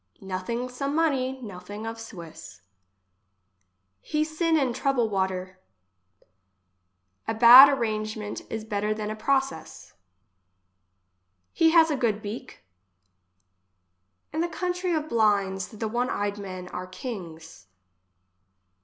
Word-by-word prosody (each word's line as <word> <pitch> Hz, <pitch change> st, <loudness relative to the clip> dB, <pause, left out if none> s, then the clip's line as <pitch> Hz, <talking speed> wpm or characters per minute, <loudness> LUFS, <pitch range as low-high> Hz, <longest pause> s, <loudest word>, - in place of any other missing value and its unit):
Nothing 195 Hz, +6 st, -4 dB
some 275 Hz, +3 st, -4 dB
money, 265 Hz, -5 st, 0 dB
nothing 205 Hz, +1 st, -8 dB
of 225 Hz, 0 st, -6 dB
Swiss. 165 Hz, -, -11 dB, 1.4 s
He 305 Hz, 0 st, -1 dB
sin 320 Hz, +1 st, 0 dB
in 265 Hz, -5 st, +1 dB
trouble 255 Hz, -3 st, +1 dB
water. 190 Hz, -1 st, -2 dB, 1.7 s
A 225 Hz, -, -1 dB
bad 245 Hz, +4 st, +10 dB
arrangement 215 Hz, -5 st, -3 dB
is 220 Hz, -1 st, -5 dB
better 210 Hz, 0 st, -1 dB
than 215 Hz, 0 st, -4 dB
a -, -, -4 dB
process. 265 Hz, -, -2 dB, 1.6 s
He 325 Hz, -, +4 dB
has 325 Hz, -1 st, +5 dB
a -, -, +1 dB
good 230 Hz, -5 st, 0 dB
beak. 220 Hz, +4 st, -8 dB, 1.7 s
In 315 Hz, -, -1 dB
the 345 Hz, -, 0 dB
country 360 Hz, +1 st, -2 dB
of 310 Hz, -1 st, -2 dB
blinds, 200 Hz, -4 st, +1 dB
the 220 Hz, 0 st, -5 dB
one 240 Hz, +3 st, -1 dB
eyed 205 Hz, 0 st, -2 dB
men 185 Hz, -2 st, -7 dB
are 180 Hz, 0 st, -6 dB
kings. 170 Hz, -, -9 dB
220 Hz, 110 wpm, -26 LUFS, 195-270 Hz, 1.7 s, bad